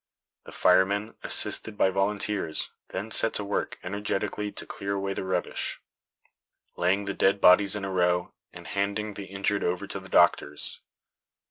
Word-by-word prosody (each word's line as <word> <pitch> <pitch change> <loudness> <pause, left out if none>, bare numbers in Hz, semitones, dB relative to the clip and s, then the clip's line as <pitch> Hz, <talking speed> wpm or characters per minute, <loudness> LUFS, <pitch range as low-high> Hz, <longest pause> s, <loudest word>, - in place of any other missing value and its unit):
The - - -11
firemen, 100 +4 +2
assisted 110 -2 +1
by 95 - +3
volunteers, 100 -3 0
then 100 +4 -5
set 115 - +2
to 105 - 0
work 100 - -2
energetically 105 +1 -3
to - - -6
clear 100 0 -4
away 100 0 -2
the - - -4
rubbish, 95 -2 -2 1.0
laying 95 +3 +1
the 100 - -2
dead 95 +1 +2
bodies 100 +2 +6
in 100 -2 -3
a 95 - -4
row, 90 -1 +1 0.2
and - - -12
handing 100 +2 -2
the 100 0 -7
injured 100 +1 -1
over 90 +1 -1
to - - -6
the - - -13
doctors. 75 0 +2
100 Hz, 155 wpm, -27 LUFS, 95-105 Hz, 1.0 s, bodies